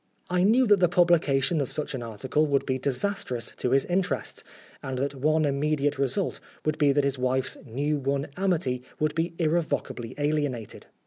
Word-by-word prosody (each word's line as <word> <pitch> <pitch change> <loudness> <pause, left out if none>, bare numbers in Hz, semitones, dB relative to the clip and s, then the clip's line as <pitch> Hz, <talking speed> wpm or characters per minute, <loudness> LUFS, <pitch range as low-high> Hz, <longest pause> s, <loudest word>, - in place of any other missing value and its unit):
I 180 0 +2
knew 230 +7 +5
that 205 -3 +5
the 180 -2 +4
publication 170 -3 +3
of 135 - -3
such 150 - -3
an 130 - -4
article 120 +7 -1
would 140 -1 +1
be 130 -1 -1
disastrous 130 - -2
to 125 - -1
his 135 +2 +3
interests, 180 +1 -1 0.4
and 130 -1 -4
that 140 +2 -1
one 155 +3 +2
immediate 145 0 0
result 140 +8 -1 0.3
would 155 +1 0
be 145 -2 +5
that 145 +1 +2
his 140 -1 0
wife's 130 +1 0
new 145 +6 -1
won 140 +1 -1
amity 170 -10 0 0.2
would 155 -1 +1
be 165 +1 -2
irrevocably 155 -7 -1
alienated. 145 -6 -2
145 Hz, 175 wpm, -27 LUFS, 130-165 Hz, 0.4 s, knew